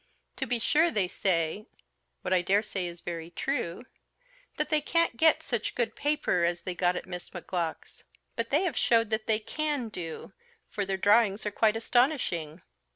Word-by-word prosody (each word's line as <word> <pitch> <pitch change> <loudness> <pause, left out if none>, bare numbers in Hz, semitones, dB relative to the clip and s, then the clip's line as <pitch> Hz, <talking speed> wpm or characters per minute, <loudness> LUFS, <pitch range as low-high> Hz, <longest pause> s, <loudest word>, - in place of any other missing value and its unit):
To 265 - -2
be 245 0 +1
sure 305 +9 +3
they 205 - +1
say 180 +3 0 0.6
what 180 - 0
I 180 - +4
daresay 195 0 0
is 170 0 -8
very 170 -1 -5
true 210 0 -3 0.7
that - - -1
they 305 -1 +3
can't 335 -2 +1
get 320 +3 +4
such 235 -7 -2
good 230 -3 -1
paper 290 - +1
as 175 0 0
they 185 - -3
got 175 0 +1
at - - -4
Miss 180 -1 -7
Macgowk's; 175 -2 -4 0.3
but 230 0 -2
they 300 +6 +3
have 345 -9 -1
showed 230 -1 +3
that 220 0 -1
they 220 -1 +2
_can 265 +1 -2
_do, 165 -5 -7 0.4
for 200 -2 -2
their 195 -1 -1
drawings 205 +1 +3
are 210 - -1
quite 215 +1 +3
astonishing. 225 - 0
215 Hz, 175 wpm, -29 LUFS, 180-250 Hz, 0.7 s, I